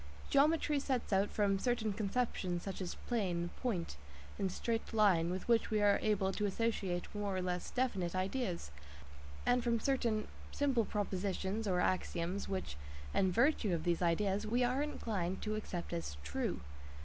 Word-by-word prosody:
Geometry 295 +1 +4
sets 260 -6 -1
out 195 +1 +3
form 200 -2 +1
certain 225 -2 0
conceptions 200 -4 -1
such 195 -1 -5
as 180 - -3
"plane," 180 -7 0
"point," 185 - -2 0.4
and 195 -2 0
"straight 225 +4 -2
line," 185 -6 +4
with 185 +1 -3
which 230 -2 +3
we 215 - +2
are 205 -1 +4
able 200 -3 +2
to 205 +2 0
associate 195 -4 -1
more 205 -2 -2
or - - 0
less 180 -1 -2
definite 195 -9 0
ideas, 185 - -2 0.7
and 245 0 +3
from 235 -1 +2
certain 230 -4 +1 0.2
simple 265 -6 +2
propositions 200 +1 -1
(axioms) 180 0 0
which, 185 - -3 0.4
in 190 -1 +3
virtue 230 - +3
of 160 - -3
these 175 -1 +1
ideas, 195 +4 +1
we 240 +3 +2
are 250 +3 +2
inclined 200 -11 -2
to 215 - -1
accept 180 -5 -4
as 165 - -3
"true." 70 0 -2
200 Hz, 155 wpm, -35 LUFS, 180-230 Hz, 0.7 s, Geometry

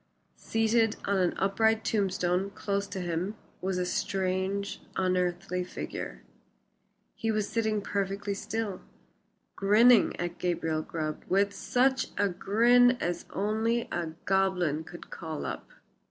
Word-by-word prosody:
Seated 225 0 +2
on 200 0 +1
an 180 -2 +1
upright 220 +3 +2
tombstone 190 -2 +1
close 200 0 -2
to 190 - -5
him 175 +4 -2 0.3
was 190 0 -1
a 180 - 0
strange, 190 +2 -1
unearthly 180 0 0
figure. 180 - -6 0.9
He 225 - -3
was 215 -2 +1
sitting 220 -3 0
perfectly 200 +1 -2
still, 205 -1 -3 0.7
grinning 220 +3 +5
at 175 0 -3
Gabriel 165 -3 0
Grubb 155 -1 -4
with 200 +1 +3
such 260 +5 +1
a 205 0 +2
grin 240 +7 +4
as 175 0 -2
only 220 +4 0
a 165 -2 -3
goblin 185 -5 +1
could 175 +2 -11
call 160 -3 -5
up. - - -5
195 Hz, 125 wpm, -29 LUFS, 180-215 Hz, 0.9 s, grinning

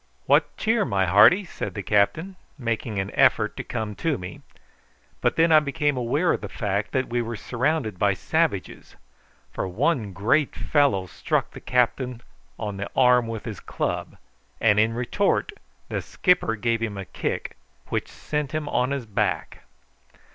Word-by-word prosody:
"What - - +3
cheer, 225 -1 +2
my 95 - +1
hearty?" 110 - +6
said 175 - -6
the 100 - -4
captain, 160 - +1 0.2
making 115 -4 -3
an 95 +1 -2
effort - - +3
to - - -4
come 110 -3 -4
to 160 -5 0
me; 90 -2 -8 0.8
but - - +2
I 165 - +7
then 155 -2 +5
became 145 0 0
aware 130 +8 +1
of - - -3
the 105 - -6
fact 100 0 -2
that 130 0 0
we 120 0 0
were 115 0 -4
surrounded 125 - -1
by 100 -1 +3
savages, - - -2 0.6
for - - -3
one 115 - 0
great 125 +10 +1
fellow 140 -11 +2
struck 90 - -2
the - - -11
captain 125 0 0 0.3
on 105 -3 -4
the 100 - -4
arm 125 -2 +5
with 115 -2 -5
his 110 -5 -6
club, - - -3 0.4
and 105 -2 +4
in 110 +1 +2
retort 195 - 0 0.4
the - - -3
skipper 180 - +1
gave 115 +1 0
him 105 -3 -3
a 95 - -5
kick 75 - -4 0.3
which - - -2
sent 150 0 -4
him 155 -1 -2
on 125 -2 +1
his 140 -3 -3
back. 105 - -2
120 Hz, 165 wpm, -24 LUFS, 105-145 Hz, 0.8 s, I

